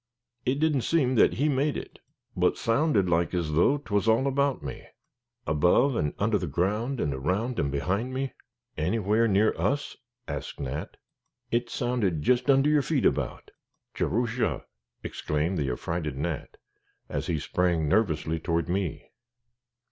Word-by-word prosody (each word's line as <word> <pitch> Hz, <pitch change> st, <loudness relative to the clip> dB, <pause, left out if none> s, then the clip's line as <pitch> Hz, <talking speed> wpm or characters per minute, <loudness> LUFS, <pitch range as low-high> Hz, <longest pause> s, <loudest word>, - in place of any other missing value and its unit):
It 135 Hz, +2 st, +1 dB
didn't 155 Hz, -4 st, +2 dB
seem 135 Hz, -2 st, +2 dB
that 115 Hz, -, +5 dB
he 145 Hz, +4 st, +1 dB
made 145 Hz, +1 st, +1 dB
it, -, -, -9 dB, 0.4 s
but -, -, +2 dB
sounded 115 Hz, -, +2 dB
like 85 Hz, +1 st, +1 dB
as 85 Hz, -3 st, -1 dB
though 90 Hz, -, +4 dB
'twas 105 Hz, -7 st, -1 dB
all 115 Hz, +4 st, +4 dB
about 140 Hz, -, +1 dB
me, 70 Hz, -, -7 dB, 0.6 s
above 90 Hz, -, +3 dB
and 75 Hz, -8 st, -1 dB
under 105 Hz, 0 st, +1 dB
the 90 Hz, -, -3 dB
ground, 105 Hz, -, -1 dB
and 70 Hz, -, 0 dB
around 95 Hz, -, -1 dB
and 70 Hz, 0 st, 0 dB
behind 100 Hz, -, -1 dB
me." 130 Hz, +1 st, -3 dB, 0.4 s
"Anywhere 105 Hz, +6 st, +1 dB
near 105 Hz, +1 st, +3 dB
us?" 145 Hz, +1 st, -1 dB, 0.3 s
asked 70 Hz, -1 st, -5 dB
Nat. 70 Hz, +2 st, -5 dB, 0.5 s
"It 120 Hz, 0 st, 0 dB
sounded 115 Hz, -12 st, -1 dB
jist 125 Hz, -, +2 dB
under 135 Hz, +1 st, +5 dB
your 150 Hz, -1 st, +4 dB
feet -, -, 0 dB
about." -, -, -1 dB, 0.4 s
"Jerusha!" 115 Hz, -, -1 dB, 0.4 s
exclaimed 80 Hz, +4 st, -2 dB
the 70 Hz, -3 st, 0 dB
affrighted 75 Hz, +2 st, -3 dB
Nat, 80 Hz, +1 st, -4 dB, 0.5 s
as -, -, -3 dB
he 85 Hz, -, 0 dB
sprang 85 Hz, +1 st, 0 dB
nervously 80 Hz, -3 st, +1 dB
toward 85 Hz, 0 st, -1 dB
me. 90 Hz, -3 st, -3 dB
100 Hz, 150 wpm, -27 LUFS, 80-125 Hz, 0.6 s, that